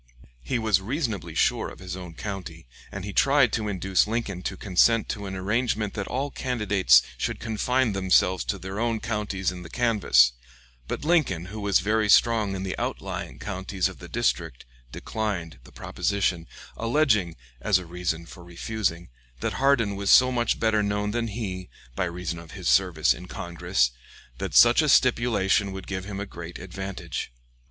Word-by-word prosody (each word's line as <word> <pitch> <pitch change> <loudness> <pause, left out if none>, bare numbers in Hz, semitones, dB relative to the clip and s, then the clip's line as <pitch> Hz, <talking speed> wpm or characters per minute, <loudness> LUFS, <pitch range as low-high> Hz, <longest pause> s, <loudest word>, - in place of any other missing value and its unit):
He - - -2
was 110 -4 +2
reasonably 115 - -3
sure - - +1
of - - -12
his 90 -1 -7
own 90 -3 -9
county, 95 - -7 0.3
and 100 -1 -6
he 100 - -6
tried 135 -2 +4
to 110 -1 -1
induce 95 -1 +1
Lincoln 105 -5 -3
to - - -4
consent 110 +4 +3
to 100 -1 -4
an 95 - -5
arrangement 105 +2 -1
that 105 -2 -4
all 140 +3 -2
candidates 105 - +3 0.2
should - - -2
confine 120 +1 0
themselves 95 -1 +2
to 100 - -2
their 95 +2 -6
own 115 -1 0
counties 105 -4 -2
in 90 -1 -8
the 85 - -10
canvass; 105 - +4 0.6
but - - -4
Lincoln, 145 - +2
who 110 - -5
was 100 -3 +2
very 105 +2 +1
strong 110 -3 +4
in 95 - -4
the 95 -1 -3
outlying - - -4
counties 95 -2 -2
of - - -10
the - - -10
district, - - -1 0.3
declined 90 - -4
the - - -15
proposition, 95 -4 -1 0.3
alleging, 115 - +2 0.3
as 100 +8 +3
a 90 - -6
reason 85 -1 -3
for 85 +1 -12
refusing, 85 0 -3 0.3
that - - -2
Hardin 130 -7 +2
was 100 0 -2
so 130 0 +7
much 120 -2 0
better 110 -1 +2
known 105 0 -1
than 115 +1 -1
he, 100 -5 -5 0.3
by - - 0
reason 85 -1 -4
of 85 -1 -12
his 90 -3 -5
service 90 -5 +3
in 90 - -10
Congress, 80 -8 -1 0.5
that - - -4
such 120 +5 +7
a 155 - +1
stipulation 110 -6 +3
would 95 -1 -7
give 95 -1 -4
him 100 -1 -6
a 100 - -3
great 85 -3 -9
advantage. 90 -4 -6
100 Hz, 175 wpm, -25 LUFS, 90-110 Hz, 0.6 s, so